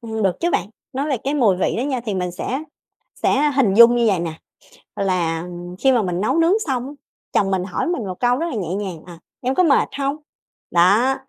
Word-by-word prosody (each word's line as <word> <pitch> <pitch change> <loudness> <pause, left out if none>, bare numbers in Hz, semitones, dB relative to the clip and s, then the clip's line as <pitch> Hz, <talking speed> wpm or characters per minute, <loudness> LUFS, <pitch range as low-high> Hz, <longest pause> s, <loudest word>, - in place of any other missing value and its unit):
ưm, 220 -2 -4
được 190 -2 +1
chứ 345 - +1
bạn. 205 - -1 0.2
Nói 280 +3 -2
về 265 - +1
cái 280 +2 0
mùi 220 -10 +3
vị 185 - 0
đó - - 0
nha 265 -3 -2
thì 220 -4 -4
mình 180 -1 -2
sẽ 260 - -4 0.6
sẽ 295 +2 +3
hình 215 -8 +3
dung 235 +2 +8
như 235 -1 +2
vầy 190 -4 +2
nè, 165 -2 -3 0.6
là 175 -4 -1 0.3
khi 265 -1 +3
mà 235 -3 +2
mình 180 -1 -2
nấu 260 +9 +1
nướng 330 +2 +4
xong 255 -2 -2
á, 285 - -8 0.4
chồng 195 - +2
mình 190 -2 0
hỏi 185 - -3
mình 335 -11 -2
một 185 -1 -6
câu 245 0 +3
rất 335 - -2
là 330 - -4
nhẹ 185 -4 -3
nhàng, 190 -6 -5
ờ, 175 - -10 0.3
"Em 260 +1 -1
có 365 - +3
mệt 310 -5 +3
hông?" 275 +1 -1 0.5
Đó, 200 +10 +4
230 Hz, 235 wpm, -20 LUFS, 185-270 Hz, 0.6 s, dung